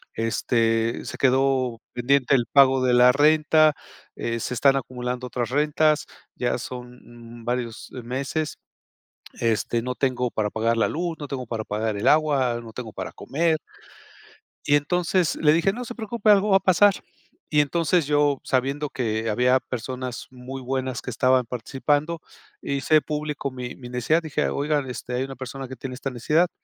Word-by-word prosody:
este, 115 0 0
se - - -6
quedó 130 -2 +2
pendiente 135 +2 +2
el 125 - +3
pago 135 -2 +5
de 125 -1 +3
la 125 +1 +7
renta, 155 +2 +5 0.5
eh, 115 0 -2
se - - -3
están 135 +3 +4
acumulando 125 -1 -4
otras 120 -1 -2
rentas, 150 +2 +2 0.3
ya 120 - -1
son 120 -2 -10
varios 120 -2 -3
meses, 135 +5 -3 0.8
este, 115 +1 0
no 125 +1 -3
tengo 125 -2 0
para 110 -2 -1
pagar 115 +2 0
la - - +3
luz, 170 +1 -3
no 145 - -7
tengo 135 -2 -4
para 115 -1 -4
pagar 105 0 -2
el - - +1
agua, 140 -6 +3
no 115 -1 -11
tengo 115 -2 -7
para - - -5
comer". 160 +2 0 1.1
Y 145 - +5
entonces 175 +3 +1
le 150 -1 +4
dije: 170 +5 +2
"No 250 +2 -5
se 240 - -7
preocupe, 220 -2 0
algo 205 0 +5
va 195 - +6
a - - +4
pasar", 195 +2 +5 0.6
y 150 - +4
entonces 165 +2 +1
yo, 145 -2 +2
sabiendo 135 +3 0
que 115 -4 -2
había 125 +4 +3
personas 125 0 -5
muy 130 +1 -8
buenas 130 0 -3
que - - -5
estaban 130 +2 +3
participando, 145 +7 -1 0.4
hice 145 +2 +2
público 150 -2 -3
mi 125 -1 -7
mi 125 -2 -10
necesidad, 125 +7 +1
dije: 155 -3 -1
"Oigan, 145 -1 -1
este, 125 0 -6
hay 130 - 0
una 135 0 -8
persona 130 +1 -7
que 130 - -8
tiene 130 0 -6
esta 135 +2 -4
necesidad", 150 +8 +2
130 Hz, 165 wpm, -24 LUFS, 125-150 Hz, 1.1 s, la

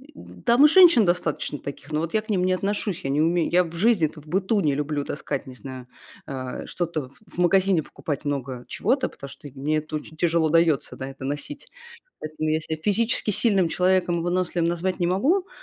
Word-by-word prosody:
м, - - -14
там 245 +5 +6
и - - +7
женщин 340 - +7
достаточно 170 -4 -1
таких, 140 +1 -8
но 150 - 0
вот 165 +1 -3
я 220 - +2
к 220 - -21
ним 185 -3 +1
не 185 - +2
отношусь. 200 0 -2
Я 135 - -2
не 145 +2 +1
умею. 170 +1 +1
Я 180 +1 +5
в 165 - -10
жизни-то 170 -6 +1
в 150 - -20
быту 195 +5 +1
не 145 -5 +1
люблю 145 0 -2
таскать, 145 -1 -4
не 130 - -10
знаю, 130 -1 -9 0.4
э, 130 -2 -5
что-то 160 -6 -3
в 140 - -24 0.2
в - - -15
магазине 185 -1 +3
покупать 145 0 -5
много 130 -3 -3
чего-то, 255 +5 0
потому 140 - -10
что 145 - -11
мне 150 +3 0
это 155 0 -3
очень 155 +1 -11
тяжело 165 -1 +2
даётся, 165 -3 +2
да, 130 0 -6
это 135 0 -9
носить. 145 - -5 0.5
Поэтому 155 0 -3
я 155 +1 +1
ся 160 0 -4
физически 210 +5 0
сильным 195 -4 +3
человеком, 180 -1 +1
выносливым 175 -1 0
назвать 175 +2 -1
не 175 - +1
могу, 295 - +1
170 Hz, 205 wpm, -24 LUFS, 150-190 Hz, 0.5 s, и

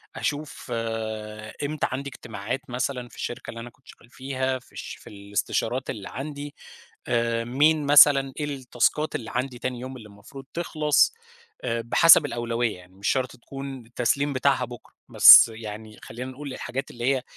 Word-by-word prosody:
أشوف 150 +1 -4
آآ 110 -2 -5
إمتى 150 +1 -1
عندي 140 +2 -4
اجتماعات 115 0 -6
مثلًا 125 0 -3
في - - -17
الشركة 120 - -6
اللي 115 - -7
أنا 120 +1 -8
كنت 130 +1 -30
شغّال 120 - -16
فيها 130 0 -3
في 125 - -24
الش - - -8
في - - -15
الاستشارات 105 +5 -3
اللي 100 -3 -6
عندي 145 +1 -7 0.5
آآ، 115 -1 0
مين 150 +5 +2
مثلًا، 140 -2 +6
إيه 150 - -1
التاسكات 135 +1 -1
اللي 115 - -5
عندي 125 0 -2
تاني 125 -1 -4
يوم 130 +1 -7
اللي 110 -3 -12
المفروض 110 +7 -13
تخلَص 155 - +2 0.5
آآ، 115 0 -1
بِحسَب 150 +6 +6
الأولوية 120 -4 -2
يعني 90 +1 -18
مش 100 +2 -5
شرط 130 -1 0
تكُون 135 0 -8
التسليم 125 +5 0
بتاعها 130 -1 +1
بُكرة 120 0 -13
بس - - +10
يعني 110 0 -9
خلّينا 125 +3 -7
نقول 140 0 -8
الحاجات 135 +1 -5
اللي 120 0 -5
هي 130 - -4
125 Hz, 165 wpm, -25 LUFS, 115-140 Hz, 0.5 s, بس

